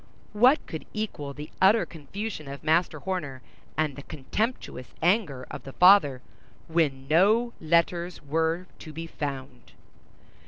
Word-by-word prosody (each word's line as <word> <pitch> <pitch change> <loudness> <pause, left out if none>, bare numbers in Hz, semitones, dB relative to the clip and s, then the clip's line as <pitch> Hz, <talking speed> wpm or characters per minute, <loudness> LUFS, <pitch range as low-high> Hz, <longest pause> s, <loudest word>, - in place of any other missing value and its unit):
What 250 +7 +4
could 160 - -7
equal 200 -10 -4
the 150 0 -8
utter 200 +4 +5
confusion 170 +2 -6
of 140 0 -8
Master 165 +3 +2
Horner 145 -9 -4 0.3
and 155 -3 0
the 140 - -8
contemptuous 150 - -4
anger 165 - +1
of - - -6
the 135 - -10
father, 175 -9 +6 0.4
when 145 -5 0
no 210 - +3
letters 170 +2 +1
were 160 +4 -1
to 155 - -9
be 165 +2 -5
found! 140 -5 -6
160 Hz, 130 wpm, -27 LUFS, 140-190 Hz, 0.4 s, father